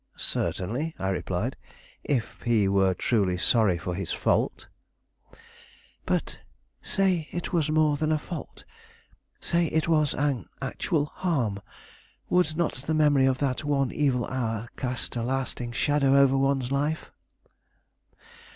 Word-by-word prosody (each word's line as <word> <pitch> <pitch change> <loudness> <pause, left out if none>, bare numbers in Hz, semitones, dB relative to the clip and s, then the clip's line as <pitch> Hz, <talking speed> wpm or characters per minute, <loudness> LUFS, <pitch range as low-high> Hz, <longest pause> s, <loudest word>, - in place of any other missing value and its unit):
"Certainly," 125 - -2
I 95 - -2
replied; 95 - -2 0.5
"if 130 -6 -2
he 115 -4 +2
were 95 -1 +3
truly 95 -3 +1
sorry 100 -1 +3
for 90 +1 -4
his 95 0 -4
fault." - - 0 1.4
"But - - -1 0.4
say 185 -5 +1
it 175 +1 -4
was 160 -3 +2
more 155 -1 +3
than 155 +1 0
a 155 - +3
fault; 165 +2 -8 0.8
say 170 -1 +1
it 160 +1 0
was 155 -3 +2
an 135 -8 -1
actual 150 -3 -1
harm; 135 - -1 0.7
would 175 -4 +2
not 170 -2 +1
the 145 +4 -3
memory 145 -3 +4
of 130 -1 +2
that 130 +2 -2
one 140 -2 +1
evil 130 -5 +1
hour 115 -3 -3
cast 125 -1 -3
a 120 - -1
lasting 125 -1 -2
shadow 140 +2 +2
over 135 -1 +5
one's 135 -1 +1
life?" 145 +3 -1
135 Hz, 135 wpm, -27 LUFS, 115-155 Hz, 1.4 s, over